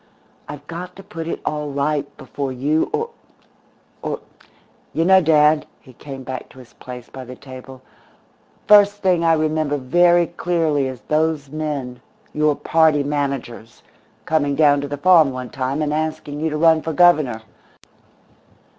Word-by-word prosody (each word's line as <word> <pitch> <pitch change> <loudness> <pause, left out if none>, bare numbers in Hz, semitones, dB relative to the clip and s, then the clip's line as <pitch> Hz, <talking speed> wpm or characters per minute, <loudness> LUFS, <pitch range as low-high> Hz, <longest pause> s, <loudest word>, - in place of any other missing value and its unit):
I've 145 0 -9
got 180 +3 -8
to 195 - -12
put 165 -2 -7
it - - -4
all 150 -1 -2
right 140 +1 -2
before 135 +1 -5
you 145 +5 0
or 455 +2 -2 0.9
or - - -3 0.7
You 165 - +1
know, 190 +1 +6
dad," 155 -1 +3
he 130 - -17
came 135 +1 -9
back 130 -1 -7
to - - -19
his 125 -3 -15
place 125 -1 -10
by 130 - -9
the 125 0 -10
table, 130 0 -12 0.8
"the 210 - +5
first 205 0 +5
thing 180 -3 +2
I 165 -1 +4
remember 155 -2 0
very 175 +6 +3
clearly 165 -5 -1
is 130 -2 -7
those 155 -2 -1
men, 145 -5 -4 0.3
your 150 -1 +2
party 160 -2 +2
managers, 140 -5 -4 0.4
coming 145 -3 +1
down 145 -1 +4
to 145 - -4
the 145 +1 -5
farm 165 -1 +5
one 130 -1 -6
time 135 +3 -2
and 150 0 -1
asking 155 -1 -3
you 160 +1 -1
to 150 - -3
run 160 0 +4
for 160 - -4
Governor. 145 -9 +3
150 Hz, 160 wpm, -20 LUFS, 135-160 Hz, 0.9 s, know